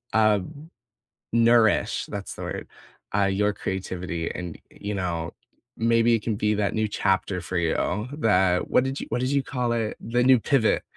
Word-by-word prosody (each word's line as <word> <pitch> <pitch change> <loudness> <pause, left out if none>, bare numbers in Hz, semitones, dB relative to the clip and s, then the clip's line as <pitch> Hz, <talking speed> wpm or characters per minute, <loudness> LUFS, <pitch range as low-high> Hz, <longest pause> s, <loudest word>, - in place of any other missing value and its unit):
Um, 110 - +1 0.6
nourish, 115 -1 +3
that's - - -6
the - - -9
word, - - -5 0.5
uh, 100 -1 +3
your 100 +2 +1
creativity 90 -4 -4
and, 90 -2 -6
you 105 +1 -6
know, 85 -3 -2 0.5
maybe 115 +1 +3
it 110 - +1
can 110 -3 -1
be 105 +1 +1
that 100 -1 0
new 110 -1 0
chapter 95 -1 0
for 90 +1 -6
you 105 +7 0
that 95 -5 +2
what 125 - +4
did 135 +1 -3
you - - -5
what 125 - -1
did 130 +2 0
you 140 -1 +2
call 125 -3 -2
it? 115 -2 -1
The 120 +2 0
new 130 -2 +6
pivot. 120 -2 +2
105 Hz, 175 wpm, -25 LUFS, 95-120 Hz, 0.6 s, new